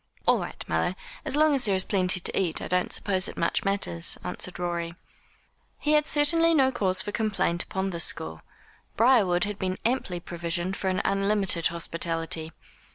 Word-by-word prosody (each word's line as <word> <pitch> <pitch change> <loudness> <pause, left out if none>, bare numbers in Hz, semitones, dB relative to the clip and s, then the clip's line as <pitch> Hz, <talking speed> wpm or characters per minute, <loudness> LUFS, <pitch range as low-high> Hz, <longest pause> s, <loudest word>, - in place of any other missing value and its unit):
"All - - +4
right, - - -6
mother. - - 0 0.3
As - - -2
long 305 0 +4
as 270 -3 +2
there 200 -2 +3
is 190 - +1
plenty 185 -2 +1
to - - -2
eat, 175 -4 0
I - - -5
don't 180 0 0
suppose 190 -2 +1
it - - -9
much 170 - +1
matters," 195 - 0
answered - - -5
Rorie. 170 -1 -3 0.8
He 300 - -1
had 300 0 +3
certainly 330 +3 +4
no 265 -3 +4
cause 190 -6 0
for 205 - -5
complaint 205 -6 0
upon 190 0 -3
this 170 -2 +2
score. 80 0 -2 0.6
Briarwood 210 -7 +4
had 205 -1 -4
been 185 -1 -2
amply 230 -7 -1
provisioned 175 +2 -3
for 195 - -4
an 185 - -1
unlimited 195 -3 +1
hospitality. 165 -1 -2
190 Hz, 175 wpm, -26 LUFS, 170-215 Hz, 0.8 s, All